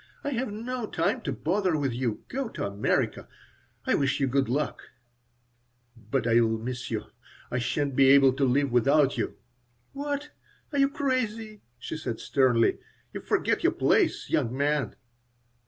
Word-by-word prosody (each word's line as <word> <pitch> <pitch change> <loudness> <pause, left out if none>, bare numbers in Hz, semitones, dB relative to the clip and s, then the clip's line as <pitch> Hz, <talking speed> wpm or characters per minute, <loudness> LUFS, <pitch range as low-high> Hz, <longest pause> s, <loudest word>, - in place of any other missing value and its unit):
"I 285 - -2
have 245 -3 -2
no 235 +2 -4
time 170 +9 0
to 160 -10 -3
bother 180 +3 0
with 140 -4 -1
you. 120 -3 -2
Go 265 -2 -3
to - - -4
America. 100 +1 -1 0.6
I - - +2
wish 140 0 +1
you 135 - +2
good 135 -1 +1
luck." 145 +4 -1 1.1
"But 115 +3 -3
I'll 115 -1 +3
miss 120 +2 -5
you. - - -2 0.5
I 120 - 0
sha'n't 140 +3 -1
be 135 0 +5
able 135 -1 +7
to 135 - -1
live 135 +1 +2
without 135 +3 +3
you." - - -2 0.6
"What? 290 +1 -4 0.4
Are 285 - +1
you 275 0 +4
crazy?" 225 -6 -2 0.2
she 125 - -6
said, 120 -7 -4
sternly. 125 -4 +2 0.3
"You - - -5
forget - - 0
your - - +3
place, - - +2
young 120 +3 0
man!" 145 0 0
140 Hz, 155 wpm, -27 LUFS, -, 1.1 s, able